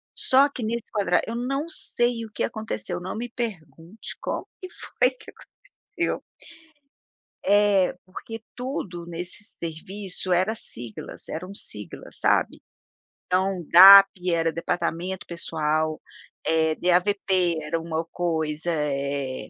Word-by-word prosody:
só 270 +2 +5
que 270 - -8
nesse 230 +1 -2
quadra 200 -4 +2
eu 230 - -4
não 275 +5 -2
sei 240 -7 0
o 220 - -13
que - - -3
aconteceu, 175 - -4
não 185 +4 -5
me 240 +2 -3
pergunte 180 - -6
como - - -3
que 370 - -7
foi 250 - 0
que 255 - -14 0.4
aconteceu. 340 0 -3 1.2
É, 200 -2 +4
Porque 225 +4 -8
tudo 210 - -5
nesse 175 +5 -5
serviço 185 +3 -6
era 190 +5 +2
siglas, 120 - -6
eram 180 +4 -6
sigla, 105 - -4
sabe, - - +1 0.6
então 185 0 0
DAP 195 +3 +11 0.3
era 165 -1 +1
departamento 175 +2 -2
pessoal, 155 -2 -1 0.4
eh, 160 -1 +2
DAVP 180 -1 +2
era 155 +2 -2
uma 165 0 -3
coisa, 160 -1 -2
eh, 140 -5 -2
180 Hz, 120 wpm, -25 LUFS, 160-210 Hz, 1.2 s, DAP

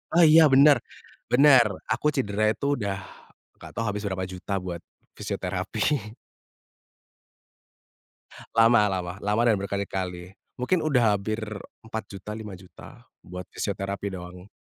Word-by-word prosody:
Oh 175 - +7
iya 160 0 +8
bener 140 +2 +6 0.5
bener 135 -2 +7 0.3
aku 150 - 0
cidera 105 -5 -1
itu 140 - -6
udah, 100 -2 -2 0.6
gak - - -11
tau 115 - -2
habis 105 -1 -3
berapa 95 -1 -3
juta 95 +2 -4
buat, 85 -2 -5 0.4
fisioterapi. 115 -7 -2 2.4
Lama 115 -2 +5
lama 90 -1 -3
lama 105 +3 +1
dan 110 - +4
berkali-kali 95 -2 -4 0.2
mungkin 165 +7 +1
udah 120 -8 +3
hampir 110 +3 -3 0.5
Rp4.000.000 105 -2 -7
Rp5.000.000 100 -4 -11 0.2
buat 90 0 -8
fisioterapi 100 0 -3
doang, 90 +2 -10
105 Hz, 115 wpm, -25 LUFS, 95-120 Hz, 2.4 s, iya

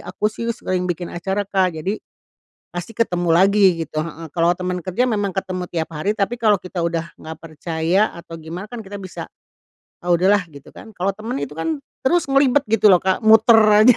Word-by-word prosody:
aku 215 0 -2
sih 230 +1 -5
sering 185 -5 -2
bikin 175 0 -4
acara 190 +4 -2
Kak, 185 -4 0
jadi 195 +7 -3 0.7
pasti 175 +5 -7
ketemu 175 -6 0
lagi 190 -3 +4
gitu, 155 0 -4
heeh. 165 -1 -7
Kalau 170 +1 +2
temen 180 0 -3
kerja 185 +9 -1
memang 205 -6 -1
ketemu 185 -1 -3
tiap 165 -1 -3
hari, 195 +8 -2
tapi 230 +4 -1
kalau 210 -3 +4
kita 180 -1 -6
udah 170 -1 -2
nggak 160 0 -8
percaya 165 +5 -1
atau 170 -1 -12
gimana 170 +5 -7
kan 240 -2 -6
kita 205 -1 -10
bisa, 185 -3 -8 0.8
ah, 175 - -7
udah 175 +2 +3
lah, - - -6
gitu 140 -2 -14
kan. - - -12
Kalau 190 +2 0
temen 215 - -5
itu 140 0 -5
kan 160 -2 -2 0.3
terus 345 +6 +3
ngelibet 275 0 +4
gitu 215 -1 +4
loh - - +8
Kak, 190 +2 0
muter 220 +1 +7 0.3
aja 250 -1 +7
185 Hz, 200 wpm, -20 LUFS, 170-210 Hz, 0.8 s, loh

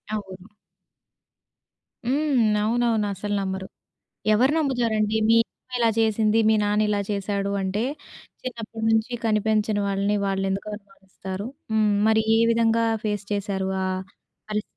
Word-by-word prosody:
అవును. 190 -2 -7 1.6
హ్మ్. 255 -5 +2
అవునవును. 225 -1 +1
అసలు 205 +2 -4
నమ్మరు. 190 0 -4 0.7
ఎవరు 255 +7 +4
నమ్ముతారండి? 230 -7 +1
మీ 230 - +6
అమ్మ 255 - -38
ఇలా 230 -1 +4
చేసింది, 220 0 +2
మీ 220 - +5
నాన్న 210 +1 +2
ఇలా 205 -1 +1
చేసాడు 200 0 -2
అంటే, 195 +3 -1 0.6
చిన్నప్పడినుంచి 225 -1 -1
కనిపించని 215 -1 +1
వాళ్ళని 200 +1 0
వాళ్ళెందుకు 195 +1 -1
అనుమానిస్తారు? 195 0 -8 0.3
హ్మ్. 215 -1 +3
మరి 220 0 +4 0.2
ఏ - - +3
విధంగా 230 0 +2 0.2
ఫేస్ 210 -1 -2
చేసారు? 195 -1 -2 0.2
ఆ - - 0 0.6
పరిస్ 210 0 -1
215 Hz, 120 wpm, -24 LUFS, 200-225 Hz, 1.6 s, మీ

